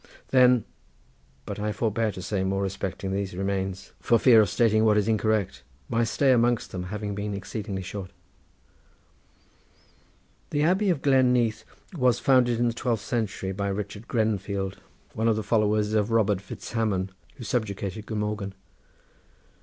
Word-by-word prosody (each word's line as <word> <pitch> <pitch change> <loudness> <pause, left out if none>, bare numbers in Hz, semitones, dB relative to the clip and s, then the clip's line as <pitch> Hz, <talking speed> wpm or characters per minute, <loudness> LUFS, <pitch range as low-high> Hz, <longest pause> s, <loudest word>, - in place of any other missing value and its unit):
Then 125 -3 +5 0.8
but - - -5
I 105 +1 -1
forbear 110 +1 0
to 90 -1 -7
say 95 0 -1
more 95 +1 0
respecting 95 0 -3
these 100 -1 -3
remains 95 -1 -3
for 115 - +3
fear 115 -2 +6
of 105 - +1
stating 110 -2 +3
what 105 -1 +4
is 105 0 +1
incorrect, 110 - 0 0.3
my 115 +1 +1
stay 130 +4 +2
amongst 120 -1 +2
them 90 -1 -4
having 105 +2 -4
been 100 0 -3
exceedingly 100 0 -5
short. 95 0 -6 2.4
The 145 -1 0
Abbey 190 +5 +2
of 170 -6 0
Glen 130 -3 +4
Neath 120 -3 +1 0.3
was 125 -5 +3
founded 125 -3 +3
in 120 - +2
the 115 - 0
twelfth 115 -2 -1
century 110 -5 -2
by 100 +1 -2
Richard 105 +3 -5
Grenfield, 100 -4 -1 0.4
one 110 +1 0
of 115 - +3
the 110 - -2
followers 105 0 +1
of 105 0 +2
Robert 105 -4 +2
Fitzhamon, 100 -2 -2 0.2
who 120 - -9
subjugated 105 -2 -3
Glamorgan. 105 -2 -3
105 Hz, 150 wpm, -26 LUFS, 100-115 Hz, 2.4 s, fear